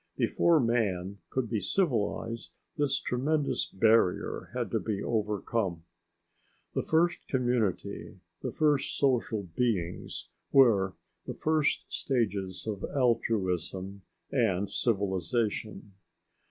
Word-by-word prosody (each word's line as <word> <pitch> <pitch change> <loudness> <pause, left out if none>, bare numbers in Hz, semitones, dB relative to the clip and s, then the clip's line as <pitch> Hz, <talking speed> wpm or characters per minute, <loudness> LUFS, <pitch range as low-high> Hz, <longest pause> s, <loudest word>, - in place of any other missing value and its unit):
Before 170 -2 +3
man 100 -6 0
could 130 -3 -1
be 110 -1 -1
civilised 115 - -1 0.2
this 140 -2 +1
tremendous 145 +4 0
barrier 110 -2 +2
had - - -3
to - - +1
be 105 -3 -3
overcome. 105 -5 -1 0.9
The - - 0
first 170 +2 +1
community, 120 -7 -1 0.2
the - - -3
first 150 -3 +1
social 120 -6 +1
beings, 90 -1 -2 0.2
were 105 -8 +5 0.3
the - - -4
first 155 -1 +1
stages 100 -8 -1
of 105 -3 -4
altruism 100 - 0 0.3
and 100 -7 +1
civilization. 105 0 -1
110 Hz, 100 wpm, -29 LUFS, 95-125 Hz, 0.9 s, were